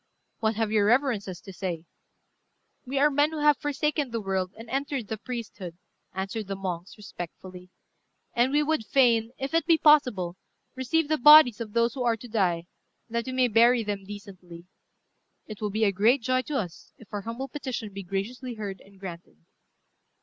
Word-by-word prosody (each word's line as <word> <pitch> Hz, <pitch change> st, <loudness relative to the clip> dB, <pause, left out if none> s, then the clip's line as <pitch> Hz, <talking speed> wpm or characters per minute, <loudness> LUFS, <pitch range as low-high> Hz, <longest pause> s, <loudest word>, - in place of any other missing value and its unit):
"What 220 Hz, 0 st, 0 dB
have 220 Hz, -1 st, -1 dB
your 210 Hz, -2 st, +3 dB
reverences 220 Hz, -7 st, +1 dB
to 195 Hz, -, -11 dB
say?" 175 Hz, -2 st, -4 dB, 1.0 s
"We 270 Hz, +2 st, -3 dB
are 295 Hz, +2 st, +4 dB
men 290 Hz, +2 st, +3 dB
who 320 Hz, -, -6 dB
have 295 Hz, -1 st, +5 dB
forsaken 290 Hz, -1 st, -1 dB
the 230 Hz, -1 st, -3 dB
world 190 Hz, -3 st, -2 dB
and 225 Hz, +1 st, -10 dB
entered 270 Hz, -2 st, -3 dB
the 220 Hz, -, -3 dB
priesthood," 210 Hz, -8 st, -7 dB, 0.3 s
answered 195 Hz, +3 st, -4 dB
the 195 Hz, -, -3 dB
monks, 185 Hz, -1 st, -5 dB
respectfully; 180 Hz, -2 st, -9 dB, 0.6 s
"and 245 Hz, +2 st, +2 dB
we 295 Hz, +1 st, +3 dB
would 310 Hz, -5 st, 0 dB
fain, 230 Hz, -1 st, +3 dB
if 270 Hz, +3 st, -4 dB
it 330 Hz, -, +1 dB
be 330 Hz, -2 st, +5 dB
possible, 250 Hz, -, +3 dB, 0.4 s
receive 275 Hz, +5 st, 0 dB
the 310 Hz, 0 st, 0 dB
bodies 275 Hz, -5 st, +8 dB
of 215 Hz, -2 st, -6 dB
those 235 Hz, 0 st, +2 dB
who 265 Hz, -, -5 dB
are 235 Hz, -2 st, +2 dB
to 245 Hz, -, -11 dB
die, 185 Hz, -7 st, 0 dB, 0.5 s
that 235 Hz, +2 st, -2 dB
we -, -, -3 dB
may 255 Hz, -1 st, +3 dB
bury 235 Hz, +1 st, +4 dB
them 205 Hz, -2 st, -4 dB
decently. 190 Hz, -4 st, -11 dB, 0.8 s
It 215 Hz, -1 st, -10 dB
will 210 Hz, -, -1 dB
be 215 Hz, +2 st, -1 dB
a 205 Hz, -, +4 dB
great 225 Hz, +7 st, +3 dB
joy 255 Hz, +1 st, +1 dB
to 295 Hz, -, -1 dB
us 180 Hz, -9 st, -6 dB
if 225 Hz, -, -18 dB
our 205 Hz, -, -2 dB
humble 230 Hz, +6 st, -5 dB
petition 250 Hz, -6 st, -5 dB
be 200 Hz, -, -6 dB
graciously 225 Hz, +7 st, -4 dB
heard 200 Hz, -3 st, -6 dB
and 195 Hz, 0 st, -19 dB
granted." 175 Hz, -, -9 dB
225 Hz, 185 wpm, -27 LUFS, 195-260 Hz, 1.0 s, bodies